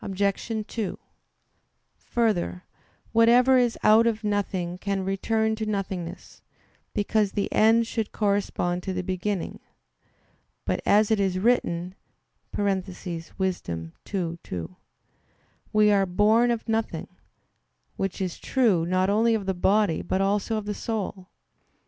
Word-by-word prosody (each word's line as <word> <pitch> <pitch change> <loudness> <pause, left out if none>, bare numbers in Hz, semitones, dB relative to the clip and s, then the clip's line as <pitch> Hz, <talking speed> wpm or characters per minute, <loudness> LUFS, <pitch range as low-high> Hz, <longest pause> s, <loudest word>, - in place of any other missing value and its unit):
2: 220 -5 -3 1.0
Further, 210 -6 -1 0.5
whatever 240 +3 +5
is 240 -2 +1
out 220 +2 +6
of 225 -1 -1
nothing 190 -4 -2
can 195 -1 -2
return 220 +3 0
to 220 0 -4
nothingness; 190 -4 -5 0.5
because 205 0 0
the 200 - -2
end 225 +2 +5
should 225 -1 -3
correspond 200 -4 0
to 190 - -4
the 185 0 -2
beginning. 185 +1 -3 1.1
But - - -1
as 210 +1 +4
it 220 - +3
is 190 -2 +1
written 185 -5 +1 0.6
(Wis. 200 -2 +1 0.8
2:2), 90 - -5 1.0
"We 210 0 +4
are 200 -1 +4
born 215 +6 +3
of 235 -1 -2
nothing"; 220 -7 -1 0.9
which 195 -1 -3
is 185 -2 -3
true, 210 -11 +2
not 185 +2 +2
only 225 +2 +3
of 210 -3 -3
the 190 - 0
body, 195 0 +2
but 190 - -1
also 205 +3 +1
of 215 - -4
the 210 - -2
soul. 200 -4 -4
205 Hz, 120 wpm, -26 LUFS, 185-220 Hz, 1.1 s, out